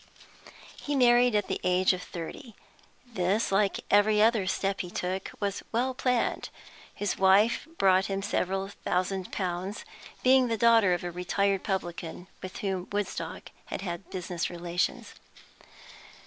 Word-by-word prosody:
He 290 - -2
married 245 -2 +5
at 205 - +1
the - - -3
age 180 +1 +3
of 180 - -5
thirty. 190 - -8 0.5
This, 205 -2 0
like 195 0 +2
every 210 +1 +5
other 220 -3 +3
step 195 +1 -1
he 180 - -6
took, 185 +2 -3
was 200 -1 -2
well 250 +3 0
planned; 250 -2 0 0.4
his 205 -2 -3
wife 195 +8 +4
brought 190 0 +4
him 195 0 -2
several 195 0 -1
thousand 185 -1 -2
pounds, 185 +2 -3 0.4
being 255 0 +5
the 225 -1 -1
daughter 225 -5 +5
of 175 - -6
a 175 - -3
retired 195 +2 0
publican 175 -3 -4 0.2
with 185 - -7
whom 190 -2 -2
Woodstock 205 -2 -4
had - - -5
had 175 -1 -5
business 180 -2 -3
relations. 175 0 -2
195 Hz, 140 wpm, -28 LUFS, 180-215 Hz, 0.5 s, married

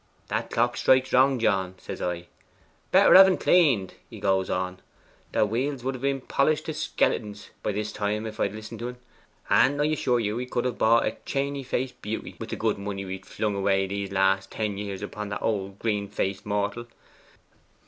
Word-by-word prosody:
"That - - -2
clock 120 +1 +1
strikes 130 0 +3
wrong, 130 +1 +5
John," 95 -5 0
says - - -8
I. 90 -1 -3 0.7
"Better - - +6
have 190 +1 +10
en 190 - +2
claned," 135 - +3 0.2
he - - -10
goes 95 -1 +1
on. 90 0 -2 0.5
The - - +3
wheels 125 +5 -2
would 135 +1 -1
have 130 - -8
been 135 -1 0
polished 150 +4 +1
to 160 - -3
skeletons 105 -8 -1
by - - -1
this 105 +1 -3
time 105 +1 -2
if 110 -1 -7
I - - +3
had 100 - -9
listened 110 +1 -8
to 120 +1 -3
en, 125 - -9 0.5
and 145 +2 +4
I 145 - +3
assure 140 -5 +1
you 105 -2 -1
we 125 +1 -3
could 125 -1 -2
have 125 -2 -2
bought 115 +1 +4
a - - -2
chainey 140 0 -2
faced 130 0 -3
beauty 110 +2 -5
wi' - - -5
the - - -4
good 110 -2 -1
money 100 -1 -4
we've 95 0 -6
flung 105 +1 -2
away 95 0 +2
these 100 0 -4
last 95 0 +2
ten 105 -2 -3
years 100 -1 -5
upon 105 0 -5
this 100 - -2
old 100 -3 -2
green 105 -2 -1
faced 100 0 -3
mortal. 105 +3 -2
105 Hz, 200 wpm, -26 LUFS, 100-125 Hz, 0.7 s, have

